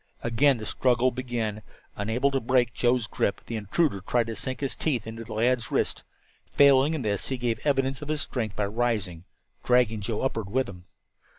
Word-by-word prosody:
Again 125 Hz, +4 st, +3 dB
the 110 Hz, -, -7 dB
struggle 125 Hz, +2 st, +2 dB
began. 120 Hz, -4 st, -3 dB, 0.3 s
Unable 115 Hz, +7 st, 0 dB
to 135 Hz, -, +1 dB
break 125 Hz, 0 st, +2 dB
Joe's 120 Hz, -1 st, +2 dB
grip, 100 Hz, -, -1 dB
the 115 Hz, -, -5 dB
intruder 110 Hz, -, 0 dB
tried 120 Hz, +5 st, +1 dB
to 115 Hz, 0 st, -5 dB
sink 130 Hz, +2 st, -4 dB
his 140 Hz, -, -2 dB
teeth 125 Hz, -8 st, -1 dB
into 115 Hz, +1 st, -7 dB
the 110 Hz, -, -8 dB
lad's 120 Hz, +2 st, +1 dB
wrist. -, -, 0 dB, 0.5 s
Failing 140 Hz, +2 st, +5 dB
in 145 Hz, -, -3 dB
this, 100 Hz, -2 st, -1 dB
he 130 Hz, -, -2 dB
gave 120 Hz, -2 st, -1 dB
an -, -, -6 dB
evidence 135 Hz, -1 st, +1 dB
of 150 Hz, -, -6 dB
his 150 Hz, -1 st, -1 dB
strength 110 Hz, -5 st, -3 dB
by 105 Hz, -, 0 dB
rising, 105 Hz, -6 st, -2 dB, 0.4 s
dragging 120 Hz, -4 st, +3 dB
Joe 105 Hz, +2 st, -2 dB
upward 115 Hz, -6 st, -2 dB
with 130 Hz, +3 st, 0 dB
him. 90 Hz, -2 st, -11 dB
120 Hz, 195 wpm, -27 LUFS, 110-130 Hz, 0.5 s, Failing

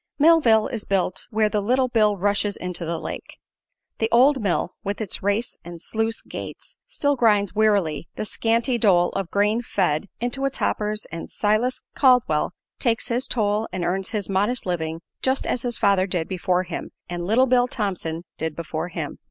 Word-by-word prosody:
Millville 285 Hz, -9 st, +5 dB
is 230 Hz, -5 st, -4 dB
built 190 Hz, -2 st, -1 dB
where 215 Hz, -2 st, +2 dB
the 210 Hz, -1 st, 0 dB
Little 255 Hz, +5 st, +2 dB
Bill 215 Hz, -4 st, +2 dB
rushes 205 Hz, +1 st, +1 dB
into 180 Hz, -1 st, -5 dB
the 165 Hz, +1 st, -2 dB
lake. -, -, -7 dB, 0.6 s
The 225 Hz, -, +1 dB
old 260 Hz, +3 st, +5 dB
mill, 185 Hz, -3 st, 0 dB
with 200 Hz, +1 st, -3 dB
its 215 Hz, -5 st, -4 dB
race 205 Hz, +4 st, 0 dB
and 175 Hz, 0 st, -9 dB
sluice 225 Hz, +5 st, -2 dB
gates, -, -, -8 dB
still 285 Hz, 0 st, 0 dB
grinds 210 Hz, -5 st, +3 dB
wearily 200 Hz, -8 st, +2 dB
the -, -, -3 dB
scanty 235 Hz, +3 st, 0 dB
dole 180 Hz, -5 st, +4 dB
of 195 Hz, -3 st, -3 dB
grain 210 Hz, +3 st, +2 dB
fed 180 Hz, -7 st, 0 dB
into 245 Hz, +3 st, -2 dB
its 275 Hz, -, -2 dB
hoppers 210 Hz, 0 st, -1 dB
and 165 Hz, +1 st, -6 dB
Silas 215 Hz, +5 st, 0 dB
Caldwell 250 Hz, -, +3 dB, 0.3 s
takes 230 Hz, -2 st, 0 dB
his 245 Hz, +2 st, 0 dB
toll 210 Hz, -1 st, +1 dB
and 180 Hz, -1 st, -2 dB
earns 190 Hz, +2 st, -1 dB
his 210 Hz, -4 st, -1 dB
modest 205 Hz, +6 st, 0 dB
living 165 Hz, -2 st, -2 dB, 0.2 s
just 265 Hz, +1 st, 0 dB
as 250 Hz, -, -1 dB
his 240 Hz, -2 st, -3 dB
father 195 Hz, -1 st, +3 dB
did 175 Hz, -4 st, -1 dB
before 185 Hz, -1 st, 0 dB
him -, -, -6 dB, 0.2 s
and 175 Hz, 0 st, -4 dB
"Little 235 Hz, +6 st, +4 dB
Bill" 250 Hz, -1 st, +3 dB
Thompson 185 Hz, -8 st, -3 dB, 0.2 s
did 160 Hz, -1 st, -2 dB
before 165 Hz, 0 st, -4 dB
him. 160 Hz, -4 st, -5 dB
210 Hz, 175 wpm, -23 LUFS, 180-235 Hz, 0.6 s, Millville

